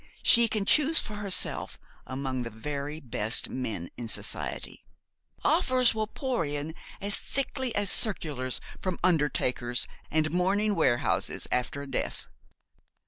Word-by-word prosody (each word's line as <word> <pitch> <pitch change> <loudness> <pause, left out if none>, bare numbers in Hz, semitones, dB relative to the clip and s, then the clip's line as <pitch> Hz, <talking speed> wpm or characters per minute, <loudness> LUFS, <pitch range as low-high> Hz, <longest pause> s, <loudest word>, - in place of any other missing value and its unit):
She 235 -1 +7
can 215 -2 -1
choose 305 +7 +5
for 210 - +1
herself 200 -2 0 0.3
among 130 -1 -3
the 115 - -4
very 145 +6 -5
best 115 -5 0
men 110 -9 -3
in 120 -1 -5
society. 110 - -1 0.6
Offers 255 -2 +3
will 220 -1 -1
pour 255 -3 -1
in 145 +1 -3 0.3
as 200 0 0
thickly 260 -3 -3
as 205 -1 +1
circulars 145 - 0 0.2
from 185 -2 -2
undertakers 135 -7 +2 0.2
and 155 0 +1
mourning 195 +4 +2
warehouses 120 -10 +1
after 125 +3 -1
a - - -8
death. - - -3
155 Hz, 130 wpm, -28 LUFS, 130-210 Hz, 0.6 s, She